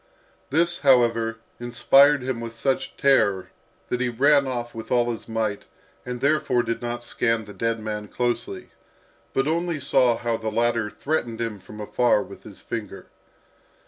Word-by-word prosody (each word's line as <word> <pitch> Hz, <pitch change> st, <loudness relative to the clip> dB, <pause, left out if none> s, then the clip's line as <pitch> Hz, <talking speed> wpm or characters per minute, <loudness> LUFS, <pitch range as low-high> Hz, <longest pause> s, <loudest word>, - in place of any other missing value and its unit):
This, 170 Hz, +4 st, +2 dB
however, 115 Hz, -4 st, +3 dB, 0.2 s
inspired 125 Hz, +4 st, +4 dB
him 125 Hz, -2 st, -3 dB
with 115 Hz, -1 st, -6 dB
such 135 Hz, +3 st, -1 dB
terror, 100 Hz, -9 st, +2 dB, 0.4 s
that 125 Hz, -, -1 dB
he 125 Hz, -, +1 dB
ran 140 Hz, +3 st, +3 dB
off 120 Hz, -2 st, -4 dB
with 115 Hz, 0 st, -8 dB
all 120 Hz, -1 st, +2 dB
his 115 Hz, 0 st, -8 dB
might, 110 Hz, -2 st, -2 dB, 0.4 s
and 125 Hz, 0 st, -5 dB
therefore 140 Hz, -4 st, +2 dB
did 115 Hz, 0 st, -3 dB
not 120 Hz, 0 st, -4 dB
scan 115 Hz, -2 st, 0 dB
the 105 Hz, -, -11 dB
dead 115 Hz, +1 st, -1 dB
man 105 Hz, -1 st, -5 dB
closely, 120 Hz, -5 st, -3 dB, 0.6 s
but 135 Hz, +1 st, 0 dB
only 170 Hz, 0 st, -1 dB
saw 130 Hz, -4 st, +3 dB
how 115 Hz, -1 st, -1 dB
the 110 Hz, -1 st, -3 dB
latter 115 Hz, 0 st, +1 dB
threatened 120 Hz, -4 st, -2 dB
him 115 Hz, -3 st, -3 dB
from 105 Hz, +3 st, -12 dB
afar 105 Hz, +1 st, +2 dB
with -, -, -12 dB
his -, -, -12 dB
finger. -, -, -6 dB
120 Hz, 160 wpm, -24 LUFS, 115-135 Hz, 0.6 s, inspired